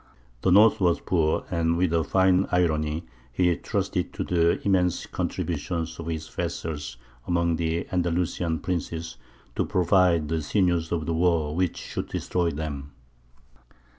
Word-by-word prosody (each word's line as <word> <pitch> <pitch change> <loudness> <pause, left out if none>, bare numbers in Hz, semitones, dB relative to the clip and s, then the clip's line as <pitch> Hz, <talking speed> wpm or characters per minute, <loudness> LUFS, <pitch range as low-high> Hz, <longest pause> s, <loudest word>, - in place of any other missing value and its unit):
The 95 - +2
north 105 +4 +6
was 85 -2 +3
poor, 80 -4 0
and 85 -1 +1
with 90 -2 +1
a 85 -1 +2
fine 95 +4 +3
irony 80 -2 +1 0.3
he 90 +7 +2
trusted - - -2
to - - -3
the 85 -1 +2
immense 90 -3 +2
contributions 85 0 -3
of 85 - -6
his 80 -1 -4
vassals 75 -8 -4 0.3
among 85 -1 +1
the 85 0 -1
Andalusian 85 -2 0
princes 85 -4 -3 0.4
to - - +1
provide 90 -3 +3
the 80 +1 -1
sinews 85 0 +1
of 80 -3 -1
the 85 - -1
war 80 -3 +1
which 90 -1 0
should - - -5
destroy 90 -2 -1
them. 70 -3 -5
85 Hz, 140 wpm, -26 LUFS, 80-90 Hz, 0.4 s, north